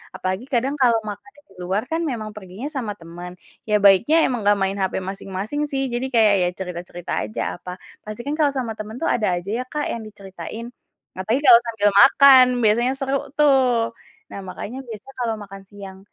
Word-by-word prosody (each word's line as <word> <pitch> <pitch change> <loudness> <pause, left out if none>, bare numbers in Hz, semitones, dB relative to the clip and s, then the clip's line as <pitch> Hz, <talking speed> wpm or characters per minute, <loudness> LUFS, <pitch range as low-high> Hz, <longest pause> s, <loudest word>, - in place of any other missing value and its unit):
Apalagi 185 +5 -3
kadang 260 +3 0
kalau 235 -3 +4
makannya 270 +8 -9
di - - -21
luar 190 +4 -1
kan 325 +1 -2
memang 225 -8 -4
perginya 200 +6 -8
sama 230 -8 -4
temen, 175 +2 -10 0.3
ya 210 - +2
baiknya 235 - +5
emang 245 -5 -3
gak 205 - +6
main 195 0 0
hape 190 0 -1
masing-masing 195 +9 -4
sih 270 -1 -1
jadi 240 +2 -2
kayak 215 -3 +5
ya 175 - +1
cerita-cerita 175 -1 -7 0.2
aja 215 - -5 0.2
apa, 180 0 -8 0.3
pasti 215 +2 -7
kan 285 - -4
kalau 300 - +4
sama 245 -4 -2
temen 215 +2 -7
tuh 330 - -2
ada 215 - 0
aja 175 +3 -6
ya, - - -2
Kak, 300 +1 -3
yang 235 - -4
diceritain. 200 +3 -9 0.5
Apalagi 220 +8 0
kalau 240 -3 +9
sambil 205 -3 +2
makan, 270 -2 +8 0.2
biasanya 235 +4 +3
seru 270 0 -1 0.2
tuh. 260 -6 +3 0.4
Nah, - - -7
makanya 205 +7 -7
biasanya 225 +4 -10
kalau 230 -2 -1
makan 195 0 -11
siang 195 -2 -11
220 Hz, 185 wpm, -22 LUFS, 195-260 Hz, 0.5 s, kalau